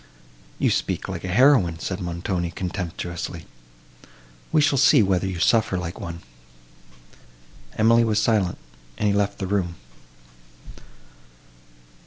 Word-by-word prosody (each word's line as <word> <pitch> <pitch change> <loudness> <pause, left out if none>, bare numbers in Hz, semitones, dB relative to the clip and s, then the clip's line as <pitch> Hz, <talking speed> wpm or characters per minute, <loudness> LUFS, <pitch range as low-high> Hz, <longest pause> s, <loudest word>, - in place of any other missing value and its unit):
"You - - +1
speak - - -2
like - - -6
a - - -4
heroine," 100 - +4
said 90 +2 -4
Montoni, 85 0 -3
contemptuously; 85 -1 -5 1.1
"we - - +3
shall 145 -2 +3
see 135 -2 +6
whether 95 -1 +1
you 95 - -3
can 85 - -5
suffer 110 -4 +2
like 90 -1 -5
one." 85 0 -7 1.6
Emily 115 +2 +4
was 110 -2 +1
silent, 105 -6 +1 0.4
and 105 - 0
he 100 - +2
left 100 0 0
the 95 - -4
room. 90 -3 -1
95 Hz, 125 wpm, -23 LUFS, 85-110 Hz, 1.6 s, see